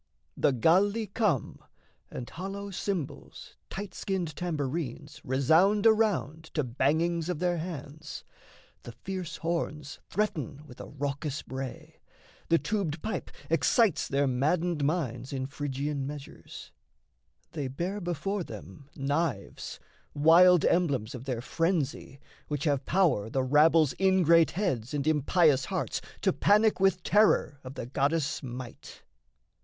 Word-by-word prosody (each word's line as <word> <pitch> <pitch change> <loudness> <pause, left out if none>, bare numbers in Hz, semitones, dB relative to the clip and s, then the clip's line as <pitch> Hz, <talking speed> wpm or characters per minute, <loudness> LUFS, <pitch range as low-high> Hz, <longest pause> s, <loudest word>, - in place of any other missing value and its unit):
The - - +3
Galli 195 - +3
come: 200 - -1 0.5
And 120 - -6
hollow 200 +3 -6
cymbals, 185 -5 -5
tight 195 -1 -6
skinned 180 -7 -3
tambourines 150 -5 -4
Resound 160 - +3
around 210 -8 +2
to 150 - +1
bangings 160 +7 0
of 180 - -1
their 175 0 0
hands; 155 -2 -7 0.6
The 120 - -10
fierce 185 +3 -6
horns 160 -3 -3
threaten 150 - -2
with 125 -5 -12
a - - -8
raucous 145 +1 -4
bray; 130 -1 -7 0.5
The 165 - +5
tubed 175 -6 -2
pipe 220 +1 -3 0.2
excites 165 - +2
their 140 +1 +1
maddened 150 +5 0
minds 135 -5 -1
In 130 -1 -2
Phrygian 140 0 -3
measures; 145 -1 -9 0.8
they 145 -4 -3
bear 175 +10 -3
before 175 +3 -2
them 105 - -11
knives, 140 -5 -2 0.4
Wild 170 +4 +6
emblems 140 -9 +1
of 125 0 -8
their 125 -4 -2
frenzy, 155 -2 -1 0.3
which 145 -2 -3
have 145 -3 0
power 170 - +2
The 130 +2 0
rabble's 150 +2 +4
ingrate 175 -4 +4
heads 150 - -1
and 140 -1 -1
impious 155 -2 +3
hearts - - -2 0.2
To - - +2
panic 210 +1 +3
with 190 -2 +2
terror 205 -8 +3
of 130 +1 -9
the - - -5
goddess' 140 +3 0
might. 125 -3 -9
155 Hz, 125 wpm, -29 LUFS, 135-180 Hz, 0.8 s, Wild